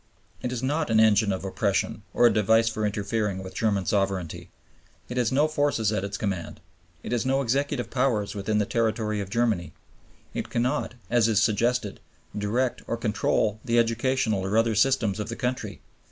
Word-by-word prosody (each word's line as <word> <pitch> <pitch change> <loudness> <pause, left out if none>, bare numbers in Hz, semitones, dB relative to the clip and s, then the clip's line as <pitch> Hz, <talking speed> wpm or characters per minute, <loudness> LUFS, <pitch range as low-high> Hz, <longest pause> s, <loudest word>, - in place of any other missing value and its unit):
It 125 - -3
is 125 -1 -4
not 150 +3 0
an 110 -1 +4
engine 110 -1 +4
of 95 0 -3
oppression 95 - -1
or 120 - +3
a 120 - +6
device 110 +2 +3
for 110 -1 0
interfering 105 -1 -2
with 95 - -9
German 100 -4 0
sovereignty. 95 -4 -1 0.6
It 125 - -5
has 120 -1 +1
no 145 +4 +3
forces 145 -8 +1
at 105 -3 -1
its 100 0 -4
command; 95 -5 -4 0.4
it - - -6
has 120 -2 +1
no 135 +1 +1
executive 140 +1 -1
powers 120 -6 0
within 105 +1 -1
the 105 - +2
territory 110 -2 0
of 95 - -6
Germany; 105 -8 0 0.6
it - - -4
cannot, 125 +2 -1 0.2
as 120 -2 +4
is 110 -3 +3
suggested, 115 0 +1 0.4
direct 115 +5 -1
or 115 - -2
control 110 -1 0
the 120 -2 +1
educational 115 -2 +1
or 100 +3 0
other 115 0 +3
systems 110 -2 +2
of 105 - -4
the 115 - -4
country. 125 +1 -3
110 Hz, 180 wpm, -26 LUFS, 105-125 Hz, 0.6 s, a